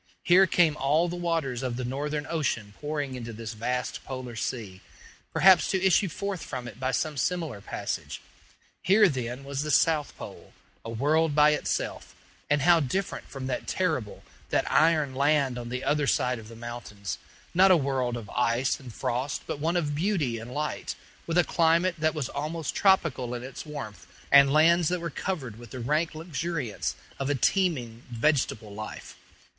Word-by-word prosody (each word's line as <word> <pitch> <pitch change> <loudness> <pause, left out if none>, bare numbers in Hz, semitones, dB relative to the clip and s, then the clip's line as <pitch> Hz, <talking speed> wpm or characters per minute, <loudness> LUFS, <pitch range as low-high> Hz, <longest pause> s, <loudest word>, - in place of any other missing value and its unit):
Here 185 +2 +6
came 170 -4 +3
all 150 +6 +2
the 175 - -4
waters 165 -8 -1
of 125 -2 -2
the 125 - -3
Northern 145 +4 -2
ocean 120 -10 -2
pouring 145 -2 -3
into 120 -2 -6
this 115 0 -6
vast 125 +3 -3
polar 130 -3 -6
sea, 110 -5 -4 0.5
perhaps 185 -3 +6
to 190 -1 +1
issue 190 +1 +4
forth 200 +1 -4
from 125 -3 -5
it 115 0 -10
by 130 0 -1
some 150 +2 -1
similar 160 - -1
passage. - - -4 0.6
Here, 205 +2 +5
then, 125 -3 -3
was 140 0 -3
the 150 - -3
South 150 -1 +2
Pole - - -10 0.3
a 115 - -7
world 150 +6 +1
by 150 0 +6
itself: 150 - -2 0.3
and 145 -1 +2
how 170 +1 +6
different 165 +7 -2
from 135 -2 -6
that 130 -1 -3
terrible, 155 - -1 0.3
that - - +1
iron 155 -4 +3
land 140 -2 +2
on 120 -1 -6
the 125 +1 -4
other 145 -1 +1
side 125 -2 +1
of 110 - -11
the 115 - -11
mountains! 115 -4 -6 0.3
not 190 +2 +6
a 185 - +7
world 130 -4 -1
of 115 -3 -8
ice 125 +1 +1
and 130 -3 -10
frost, 125 +5 -2
but - - -4
one 165 +4 +1
of 150 -4 -1
beauty 150 - 0
and 115 +2 -9
light, 150 +3 -3 0.3
with 165 +1 0
a 175 - +6
climate 170 +2 +3
that 155 +1 +1
was 145 -5 -2
almost 155 +1 -3
tropical 155 -11 +2
in 120 - -6
its 130 +4 -8
warmth, 110 - -7 0.2
and 140 -1 +8
lands 165 +3 +5
that 180 +2 0
were 170 -1 -4
covered 135 - -4
with 120 -2 -11
the 130 - -7
rank 150 +7 0
luxuriance 160 - -3 0.2
of 135 0 -1
a 145 - +2
teeming 130 - +1
vegetable 120 -4 0
life. 110 +1 -8
145 Hz, 180 wpm, -27 LUFS, 125-165 Hz, 0.6 s, and